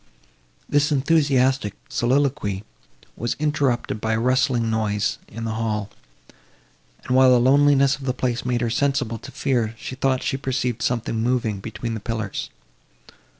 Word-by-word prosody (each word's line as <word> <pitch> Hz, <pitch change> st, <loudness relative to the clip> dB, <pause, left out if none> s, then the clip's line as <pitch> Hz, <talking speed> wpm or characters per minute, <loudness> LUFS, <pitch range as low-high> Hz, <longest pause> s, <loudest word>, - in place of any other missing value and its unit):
This 145 Hz, +1 st, +2 dB
enthusiastic 135 Hz, -6 st, +2 dB
soliloquy 125 Hz, -6 st, 0 dB, 0.5 s
was 120 Hz, +1 st, -2 dB
interrupted 140 Hz, -7 st, 0 dB
by 110 Hz, 0 st, 0 dB
a 110 Hz, -, +1 dB
rustling 125 Hz, -1 st, +2 dB
noise 105 Hz, -2 st, 0 dB
in 115 Hz, +2 st, -8 dB
the 110 Hz, -, -2 dB
hall; 110 Hz, -2 st, -2 dB, 1.1 s
and, 125 Hz, -, 0 dB
while 130 Hz, 0 st, +7 dB
the 125 Hz, -1 st, +6 dB
loneliness 140 Hz, +2 st, +4 dB
of 140 Hz, -, -9 dB
the 130 Hz, -, +1 dB
place 125 Hz, -2 st, -1 dB
made 125 Hz, -1 st, -1 dB
her 120 Hz, -, 0 dB
sensible 135 Hz, -3 st, 0 dB
to 130 Hz, -, -10 dB
fear, 120 Hz, -4 st, -1 dB
she 130 Hz, -, -7 dB
thought 130 Hz, 0 st, 0 dB
she 135 Hz, -, -1 dB
perceived 130 Hz, -3 st, -2 dB
something 115 Hz, -2 st, -1 dB
moving 115 Hz, -4 st, 0 dB
between 115 Hz, +3 st, -5 dB
the 110 Hz, -, -3 dB
pillars. 110 Hz, -1 st, -4 dB
125 Hz, 150 wpm, -23 LUFS, 110-135 Hz, 1.1 s, while